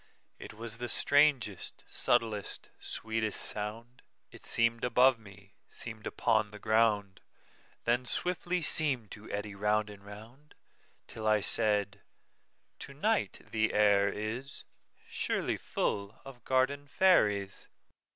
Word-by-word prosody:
It - - -10
was 115 +1 -6
the 120 0 -3
strangest, 140 -8 +2
subtlest, 115 -4 -1
sweetest 110 -1 -2
sound:It 115 +4 -5
seem'd 115 0 +1
above 125 0 +4
me, 100 -1 -16 0.2
seem'd 110 -2 -7
upon 110 -1 +1
the 105 - -11
ground, 105 -3 +1 0.6
Then 120 +2 +1
swiftly 180 +2 -1
seem'd 135 -9 +3
to 105 +1 -10
eddy 105 0 -4
round 105 +1 0
and 100 -1 -13
round, 110 +8 -13 0.5
Till 110 -1 -6
I 110 0 +4
said: 100 -1 +2 0.8
"To - - -9
night - - -1
the 110 0 0
air 100 -1 +4
isSurely 115 +6 -4
full 100 +1 -3
of 130 -4 -12
garden 135 +2 +1
fairies." 105 - +2
110 Hz, 110 wpm, -31 LUFS, 105-125 Hz, 0.8 s, above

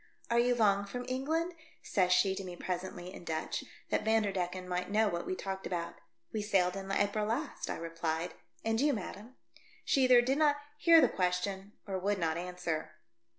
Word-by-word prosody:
"Are 235 - +4
you 245 +1 +3
long 200 -3 +3
from 245 +4 -5
England?" 315 +7 -1 0.3
says 185 -2 +2
she 190 +1 +4
to 195 - -5
me 180 -1 -7
presently 180 0 -4
in - - -10
Dutch, 160 -2 -3 0.3
that - - +1
Vanderdecken 190 -5 0
might 180 0 -2
know 215 +2 +3
what 170 -3 -2
we 185 - -1
talked 190 0 -4
about. 170 -1 -3 0.2
" 115 0 -41
We 215 - -1
sailed 190 -3 +2
in 195 0 -5
April 205 +2 +1
last," 275 +7 -2
I - - -1
replied. 165 0 -3 0.3
"And 225 +1 +1
you, 290 0 +4
madam 215 +3 -6 0.3
?" - - -28
She 270 -2 +4
either 250 -1 +7
did 265 +4 +1
not 295 -2 +5 0.2
hear 330 0 +7
the - - +6
question 190 +2 -1
or 190 -2 -2
would 200 +2 0
not 165 -3 0
answer. 175 -2 -3
195 Hz, 195 wpm, -32 LUFS, 180-225 Hz, 0.3 s, either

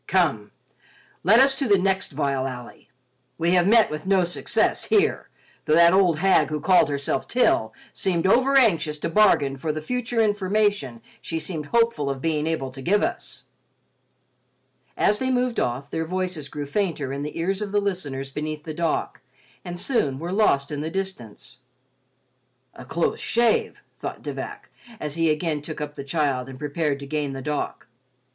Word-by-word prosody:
Come, 155 - +1 0.7
let 215 +6 +6
us 270 0 +5
to 275 - 0
the 200 -2 +5
next 190 0 0
vile 135 -2 -1
alley. 125 -2 -9 0.5
We 170 +1 +1
have 180 0 +4
met 225 +1 +5
with 150 +4 -6
no 190 -2 +4
success 175 0 0
here, 425 0 +1 0.4
though 155 - +3
that 170 +1 +6
old 185 -4 +4
hag 165 -4 +3
who 155 0 -2
called 180 +1 +4
herself 140 -1 -2
Til 110 - +2 0.2
seemed 175 -3 -1
overanxious 225 - +3
to 150 - -3
bargain 155 -8 +3
for 155 +3 -2
the 155 - -4
future 245 +7 -2
information 205 - 0 0.2
she 165 - -4
seemed 160 -2 -4
hopeful 230 -11 +1
of 135 -1 -3
being 155 +1 -1
able 145 -5 -2
to 135 +1 -10
give 205 +9 +2
us." - - -4 1.5
As 210 - +2
they 260 - -1
moved 250 -1 0
off, 130 +4 -2
their 160 - -2
voices 180 -4 -3
grew 145 -1 -5
fainter 150 -5 -2
in 140 - -4
the 150 +1 -5
ears 190 +4 -1
of 205 -2 -4
the 205 - +2
listeners 145 -9 -3
beneath 150 +1 -5
the 155 - -6
dock 165 0 -2 0.4
and 175 0 -6
soon 150 - 0
were 170 +5 -5
lost 160 -9 +2
in 145 -1 -3
the 155 - -3
distance. 185 - -6 1.1
"A 125 - -11
close 165 +6 -1
shave," 235 -1 +1 0.2
thought - - -6
De - - -4
Vac, - - -7 0.3
as 150 -1 -4
he 165 0 +1
again 155 -1 -1
took 155 +1 -7
up 150 -1 -5
the 140 - -7
child 140 -4 -1
and 130 - -9
prepared 150 0 -1
to - - -6
gain 145 -1 -2
the 135 - -6
dock. 150 +1 -3
165 Hz, 175 wpm, -24 LUFS, 145-195 Hz, 1.5 s, let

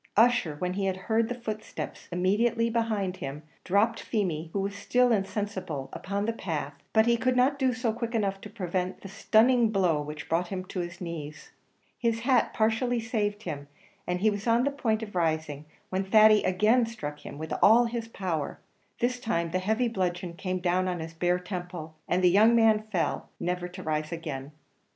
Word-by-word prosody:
Ussher, 225 -9 +4
when 180 +3 -2
he 195 +1 -1
had 190 -1 0
heard 220 +4 0
the 245 - -2
footsteps 215 -2 -6
immediately 220 +6 +1
behind 215 -5 -1
him, 145 -3 -6 0.2
dropped 210 +5 +2
Feemy, 170 -8 -2
who 200 - -1
was 200 +1 -2
still 245 +5 +2
insensible, 195 -9 -2
upon 200 +2 -3
the 230 - 0
path; 155 -9 -4 0.2
but 220 0 +4
he 235 0 +3
could 255 +2 +1
not 265 +3 +3
do 260 -2 +3
so 245 -3 -1
quick 235 0 -4
enough 195 -3 0
to 210 - -9
prevent 185 -3 -3
the - - -8
stunning 225 +4 +3
blow 180 -7 +2
which 150 0 -7
brought 170 +2 0
him 185 0 -4
on 180 - 0
his 175 +1 -7
knees. 155 -4 -7 0.5
His 230 -1 0
hat 250 0 +3
partially 230 +3 +1
saved 215 -2 -2
him, 145 -4 -5 0.4
and 180 0 -1
he 215 +1 +4
was 205 +2 -4
on 230 +1 +4
the 280 - +1
point 225 -6 0
of 210 - -8
rising, 155 -4 -1 0.3
when 190 +1 0
Thady 215 +2 +6
again 215 +6 +3
struck 170 -11 -6
him - - -8
with 160 +1 -5
all 235 +3 +7
his 230 -1 -3
power; 180 -9 -3 0.4
this 245 +1 +1
time 170 -9 -1
the 185 - 0
heavy 220 +6 +1
bludgeon 180 -5 -2
came 185 +1 -3
down 180 +1 +1
on 180 -1 -2
his 160 0 -6
bare 175 +2 +1
temple, 180 -3 -6
and 180 +1 +1
the 180 - +7
young 220 +5 +6
man 220 -2 +4
fell, 175 -5 -1
never 180 0 -2
to 180 +1 -9
rise 155 0 -2
again. 150 -5 -5
195 Hz, 190 wpm, -28 LUFS, 175-225 Hz, 0.5 s, all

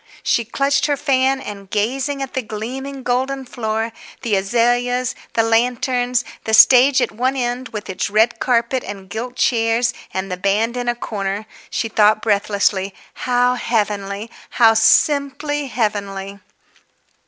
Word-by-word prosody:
She 235 - +1
clutched 275 +6 +1
her 290 -1 0
fan, 270 -2 +1
and, 200 -5 -9
gazing 270 +7 -1
at 270 - -7
the 260 - -1
gleaming, 255 +5 -6
golden 260 +2 -1
floor, 225 -2 -3 0.3
the 225 -4 +1
azaleas, 245 +4 +1 0.2
the 225 - +2
lanterns, 245 +2 +1 0.2
the 220 - +3
stage 260 +3 +7
at - - -2
one 255 +5 -1
end 250 0 -2
with 210 -2 -6
its 190 +1 -3
red 220 +3 +2
carpet 245 +1 +1
and 195 -1 -9
gilt 245 +3 -5
chairs 230 0 +1 0.2
and 190 0 -4
the 180 - -3
band 210 +5 0
in 245 -1 -2
a 240 - 0
corner, 205 -3 -4 0.2
she 225 - -2
thought 215 -1 +3
breathlessly, 200 -2 0 0.3
"How 245 0 +3
heavenly; 210 -3 -2 0.2
how 225 -2 +5
simply 285 +4 +2
heavenly!" 200 -4 -3
235 Hz, 140 wpm, -19 LUFS, 210-255 Hz, 0.3 s, stage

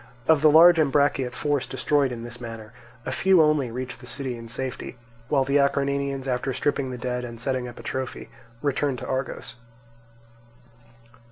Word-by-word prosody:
Of 160 -3 +5
the 155 - +6
large 165 +2 +8
Ambraciot 140 -3 +2
force 145 -3 -1
destroyed 135 +1 +1
in 115 -1 -6
this 120 +1 -9
manner, 115 -2 -8 0.3
a - - -3
few 190 -1 +4
only 150 -5 +3
reached 125 +2 -6
the 125 - -12
city 125 +1 -3
in 115 0 -9
safety; 130 +1 -5 0.3
while 140 -3 +3
the 140 +2 +2
Acarnanians, 140 -1 0
after 130 +1 -1
stripping 140 -1 -1
the 125 - -5
dead 125 0 -3
and 120 -1 -8
setting 130 0 -2
up 120 - -10
a - - -10
trophy, 130 -2 -4 0.4
returned 140 -1 0
to - - -7
Argos. 130 -2 -4
130 Hz, 170 wpm, -25 LUFS, 125-140 Hz, 0.4 s, large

